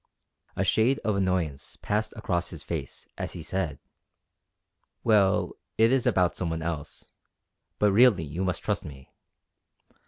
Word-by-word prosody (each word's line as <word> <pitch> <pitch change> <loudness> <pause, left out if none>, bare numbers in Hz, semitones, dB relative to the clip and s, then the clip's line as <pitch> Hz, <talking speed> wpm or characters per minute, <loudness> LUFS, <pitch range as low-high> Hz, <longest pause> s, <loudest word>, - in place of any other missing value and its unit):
A - - 0
shade 125 +5 +3
of 105 -1 +1
annoyance 90 -7 -1
passed 105 +1 0
across 90 -5 -1
his - - -7
face - - -5
as - - -3
he 85 - -7
said: 85 -5 -2 1.3
"Well, 105 -4 +3 0.3
it 115 +1 +5
is 135 -2 +2
about 90 -2 +2
some 90 - -2
one 80 0 -3
else; 80 -3 -5 0.7
but 105 -1 +3
really 105 -4 +5
you 80 +5 -4
must 90 -2 -2
trust - - -1
me. 65 -3 -11
95 Hz, 145 wpm, -27 LUFS, 80-105 Hz, 1.3 s, it